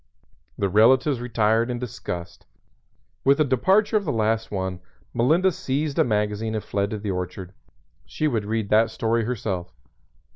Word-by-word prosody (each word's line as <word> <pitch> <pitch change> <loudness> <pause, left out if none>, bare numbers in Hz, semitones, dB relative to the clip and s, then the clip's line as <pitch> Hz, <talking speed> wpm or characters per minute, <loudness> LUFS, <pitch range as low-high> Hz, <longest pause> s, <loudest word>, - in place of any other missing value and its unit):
The 100 - +1
relatives 120 +6 +4
retired 115 0 +1
in 125 - -2
disgust. 90 -8 -7 0.8
With 140 +1 +4
the 155 - +4
departure 190 - +3
of 205 - -1
the - - 0
last 110 0 0
one 95 -2 -3 0.3
Melinda 165 +10 +3
seized 150 -4 -2
a - - +6
magazine 105 0 -1
and 110 - -3
fled 100 0 -1
to 110 - -3
the 100 -1 -3
orchard. 90 0 -5 0.5
She 155 - -1
would 115 -7 -1
read 110 -1 -2
that 110 +1 +4
story 115 0 0
herself. 100 -7 -3
110 Hz, 155 wpm, -24 LUFS, 105-130 Hz, 0.8 s, a